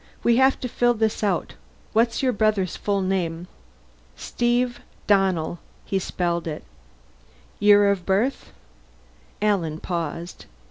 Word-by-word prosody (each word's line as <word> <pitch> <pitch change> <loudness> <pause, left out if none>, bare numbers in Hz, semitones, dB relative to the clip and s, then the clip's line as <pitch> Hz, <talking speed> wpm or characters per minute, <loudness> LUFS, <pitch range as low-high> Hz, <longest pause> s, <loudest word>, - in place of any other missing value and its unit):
"We 235 0 +4
have 265 +1 +4
to 250 - -2
fill 240 0 +1
this 220 -1 -1
out. 195 -5 0 0.4
What's 230 +3 +2
your 255 -1 +2
brother's 205 -4 +1
full 200 -1 -1
name?" 175 -2 -2 0.7
"Steve 240 - -1 0.3
Donnell." 185 -5 +1 0.3
He 195 - -1
spelled 170 -2 -2
it. 155 -1 -5 1.0
"Year 205 0 +6
of 195 -3 -2
birth?" 205 +9 0 0.9
Alan 170 -7 0
paused. 170 0 -5
200 Hz, 120 wpm, -23 LUFS, 175-230 Hz, 1.0 s, Year